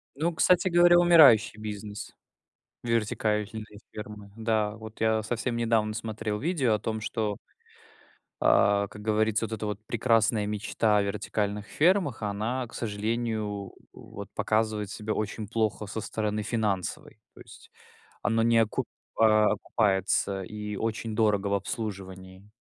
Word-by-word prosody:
Ну, 160 Hz, +5 st, 0 dB
кстати 180 Hz, +3 st, +4 dB
говоря, 175 Hz, 0 st, +6 dB
умирающий 150 Hz, -12 st, +6 dB
бизнес, 105 Hz, -1 st, -7 dB, 0.7 s
вертикальные 110 Hz, -2 st, -1 dB, 0.3 s
фермы. 105 Hz, -1 st, -9 dB
Да, 110 Hz, -2 st, 0 dB
вот 110 Hz, 0 st, -11 dB
я 110 Hz, 0 st, +2 dB
совсем 120 Hz, +2 st, -2 dB
недавно 115 Hz, -2 st, +1 dB
смотрел 110 Hz, -1 st, -4 dB
видео 140 Hz, -6 st, +1 dB
о 105 Hz, -, 0 dB
том, 110 Hz, +1 st, -3 dB
что 110 Hz, -2 st, -2 dB, 1.1 s
а, 100 Hz, 0 st, +4 dB
как 105 Hz, 0 st, -11 dB
говорится, 110 Hz, +1 st, +1 dB
вот 115 Hz, -, -11 dB
эта 110 Hz, -1 st, -3 dB
вот 105 Hz, -1 st, -3 dB
прекрасная 115 Hz, -2 st, +2 dB
мечта 105 Hz, +1 st, 0 dB
о 105 Hz, -, +3 dB
вертикальных 105 Hz, 0 st, -2 dB
фермах 165 Hz, -, +2 dB
она, 110 Hz, +5 st, -2 dB
к 120 Hz, -, -16 dB
сожалению, 110 Hz, 0 st, -2 dB
у 100 Hz, -2 st, -6 dB, 0.2 s
вот -, -, -10 dB
показывает 110 Hz, -2 st, 0 dB
себя 110 Hz, 0 st, -3 dB
очень 110 Hz, 0 st, -3 dB
плохо 110 Hz, -1 st, -1 dB
со 110 Hz, +2 st, -5 dB
стороны 105 Hz, 0 st, -2 dB
финансовой. 105 Hz, -5 st, -2 dB
То -, -, -15 dB
есть -, -, -15 dB, 0.5 s
оно 115 Hz, +1 st, +1 dB
не 115 Hz, 0 st, +4 dB
окуп 110 Hz, -1 st, +1 dB, 0.3 s
а, 110 Hz, -1 st, +5 dB
окупается, 100 Hz, -2 st, 0 dB
и 105 Hz, +2 st, -6 dB
очень 110 Hz, +1 st, -3 dB
дорого 105 Hz, -2 st, +2 dB
в 100 Hz, -, +1 dB
обслуживании. 95 Hz, -1 st, -6 dB
110 Hz, 140 wpm, -27 LUFS, 105-115 Hz, 1.1 s, говоря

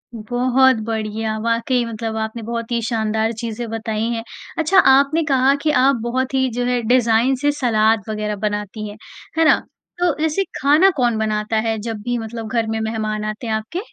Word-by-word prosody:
बहुत 255 Hz, +3 st, +2 dB
बढ़िया! 220 Hz, 0 st, -2 dB
वाक़ई 235 Hz, +2 st, +1 dB
मतलब 225 Hz, -1 st, -4 dB
आपने 220 Hz, +1 st, -4 dB
बहुत 230 Hz, +1 st, -4 dB
ही 235 Hz, -1 st, 0 dB
शानदार 220 Hz, -1 st, 0 dB
चीज़ें 230 Hz, 0 st, -4 dB
बताई 220 Hz, -1 st, -3 dB
हैं। 230 Hz, -1 st, -3 dB, 0.4 s
अच्छा 325 Hz, +5 st, +2 dB
आपने 280 Hz, +4 st, +4 dB
कहा 265 Hz, +1 st, +4 dB
कि 310 Hz, -, +2 dB
आप 270 Hz, -1 st, +4 dB
बहुत 255 Hz, +3 st, -2 dB
ही 260 Hz, -1 st, +2 dB
जो 245 Hz, 0 st, -1 dB
है 245 Hz, -1 st, +1 dB
डिज़ाइन 240 Hz, +2 st, +3 dB
से 290 Hz, 0 st, +3 dB
सलाद-वग़ैरह 215 Hz, -4 st, 0 dB
बनाती 210 Hz, +1 st, -3 dB
हैं, 205 Hz, -, -10 dB, 0.4 s
है 325 Hz, -, +4 dB
ना? -, -, +5 dB, 0.4 s
तो 350 Hz, -4 st, +2 dB
ऐसे 320 Hz, +5 st, 0 dB, 0.2 s
खाना 300 Hz, +8 st, +5 dB
कौन 240 Hz, -3 st, +2 dB
बनाता 215 Hz, 0 st, -1 dB
है 225 Hz, -, 0 dB
जब 220 Hz, -2 st, -5 dB
भी 245 Hz, +1 st, -1 dB
मतलब 225 Hz, 0 st, -6 dB
घर 230 Hz, -1 st, 0 dB
में 220 Hz, 0 st, -1 dB
मेहमान 215 Hz, -1 st, -2 dB
आते 215 Hz, +3 st, -5 dB
हैं 220 Hz, -, -1 dB
आपके? 220 Hz, +11 st, -3 dB
230 Hz, 180 wpm, -20 LUFS, 220-255 Hz, 0.4 s, ना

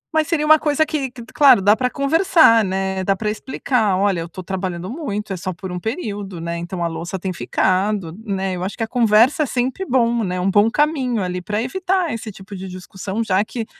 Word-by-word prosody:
Mas 310 Hz, -1 st, +2 dB
seria 325 Hz, -3 st, 0 dB
uma 310 Hz, 0 st, +6 dB
coisa 300 Hz, 0 st, +1 dB
que 280 Hz, -5 st, -3 dB, 0.2 s
claro, 285 Hz, -8 st, +7 dB
dá 205 Hz, +2 st, +4 dB
pra 250 Hz, +2 st, 0 dB
conversar, 285 Hz, -, +4 dB
né? 190 Hz, 0 st, -2 dB
Dá 195 Hz, +1 st, +1 dB
pra 210 Hz, +2 st, -2 dB
explicar: 220 Hz, -2 st, -1 dB
"Olha, 195 Hz, -2 st, +1 dB
eu 165 Hz, 0 st, -5 dB
tô 185 Hz, +2 st, -9 dB
trabalhando 185 Hz, -1 st, -4 dB
muito, 215 Hz, -7 st, -4 dB
é 185 Hz, -, -4 dB
só 185 Hz, +2 st, -4 dB
por 185 Hz, +1 st, -8 dB
um 180 Hz, -, -4 dB
período, 205 Hz, -, -5 dB
né? 170 Hz, +1 st, -4 dB
Então 175 Hz, +1 st, -4 dB
a 170 Hz, -, +1 dB
louça 170 Hz, +3 st, -5 dB
tem 185 Hz, 0 st, -4 dB
ficado." 185 Hz, -1 st, 0 dB
Né? 195 Hz, -3 st, -2 dB
Eu 180 Hz, -, -4 dB
acho 190 Hz, -, -4 dB
que 225 Hz, -, -1 dB
a 225 Hz, -, -2 dB
conversa 235 Hz, +4 st, +4 dB
é -, -, 0 dB
sempre 255 Hz, +8 st, -2 dB
bom, 235 Hz, -2 st, +2 dB
né? 180 Hz, -1 st, -2 dB
Um 190 Hz, +2 st, +1 dB
bom 205 Hz, +3 st, +4 dB
caminho 260 Hz, -6 st, 0 dB
ali, 180 Hz, 0 st, -3 dB
pra 210 Hz, +4 st, -2 dB
evitar 370 Hz, +4 st, -1 dB
esse 225 Hz, -1 st, -6 dB
tipo 195 Hz, +1 st, -11 dB
de 190 Hz, 0 st, -7 dB
discussão, 190 Hz, +3 st, -5 dB
já 195 Hz, -1 st, +2 dB
que, 225 Hz, +1 st, -5 dB
210 Hz, 220 wpm, -20 LUFS, 185-255 Hz, 0.2 s, claro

